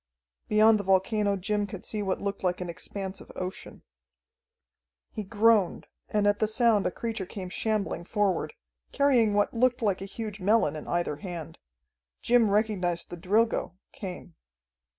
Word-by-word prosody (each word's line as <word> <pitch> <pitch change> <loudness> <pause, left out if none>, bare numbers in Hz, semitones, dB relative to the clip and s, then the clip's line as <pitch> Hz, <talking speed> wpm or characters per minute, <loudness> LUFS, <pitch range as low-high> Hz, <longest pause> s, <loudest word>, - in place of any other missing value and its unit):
Beyond 215 0 +5
the - - -3
volcano 200 +2 +2
Jim 205 +2 -1
could 195 -2 -8
see 215 - -3
what 190 -2 -1
looked 200 -1 -4
like 180 -1 0
an 180 -1 -4
expanse 190 +2 -6
of - - -13
ocean. 185 0 -7 1.3
He 215 - -5
groaned, 210 -2 +2 0.2
and 210 -1 +1
at 205 0 +3
the 215 - +2
sound 220 -2 +3
a - - -1
creature 220 -2 -4
came 185 -2 -6
shambling 210 -3 -2
forward, 205 - 0 0.4
carrying 250 -7 +3
what 205 0 +2
looked 245 +1 +2
like 200 -3 +1
a - - -4
huge 210 +1 -6
melon 195 -6 +2
in 155 - -7
either 175 -4 -1
hand. 170 -1 -7 0.6
Jim 235 -3 +4
recognized 200 -5 0
the - - -4
Drilgo, 205 +3 +1 0.2
Cain. 180 -3 -8
205 Hz, 155 wpm, -28 LUFS, 185-220 Hz, 1.3 s, Beyond